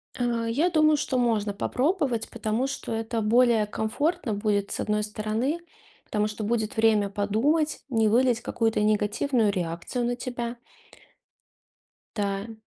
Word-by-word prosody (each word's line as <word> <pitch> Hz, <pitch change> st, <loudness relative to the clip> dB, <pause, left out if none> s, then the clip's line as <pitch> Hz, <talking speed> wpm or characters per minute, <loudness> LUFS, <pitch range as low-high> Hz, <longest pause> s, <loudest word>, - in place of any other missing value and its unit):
Э, 235 Hz, -2 st, -1 dB
я 300 Hz, +10 st, +2 dB
думаю, 310 Hz, -3 st, +4 dB
что 265 Hz, -3 st, -1 dB
можно 220 Hz, -4 st, +1 dB
попробовать, 260 Hz, -, 0 dB
потому 225 Hz, +3 st, -1 dB
что 275 Hz, -3 st, -5 dB
это 225 Hz, +1 st, -2 dB
более 230 Hz, 0 st, +4 dB
комфортно 220 Hz, -, -1 dB
будет, 205 Hz, -1 st, 0 dB
с -, -, -3 dB
одной 210 Hz, 0 st, 0 dB
стороны. 215 Hz, +9 st, -2 dB, 0.5 s
Потому 210 Hz, 0 st, 0 dB
что 215 Hz, 0 st, -5 dB
будет 220 Hz, +2 st, -1 dB
время 215 Hz, -2 st, +3 dB
подумать, 230 Hz, +11 st, +1 dB
не 225 Hz, -4 st, +2 dB
вылить 240 Hz, +1 st, +3 dB
какую-то 225 Hz, -3 st, 0 dB
негативную 215 Hz, +2 st, +2 dB
реакцию 180 Hz, +6 st, -3 dB
на 245 Hz, -, 0 dB
тебя. 240 Hz, -1 st, -5 dB, 1.6 s
Да. 200 Hz, +1 st, -2 dB
225 Hz, 135 wpm, -26 LUFS, 210-250 Hz, 1.6 s, думаю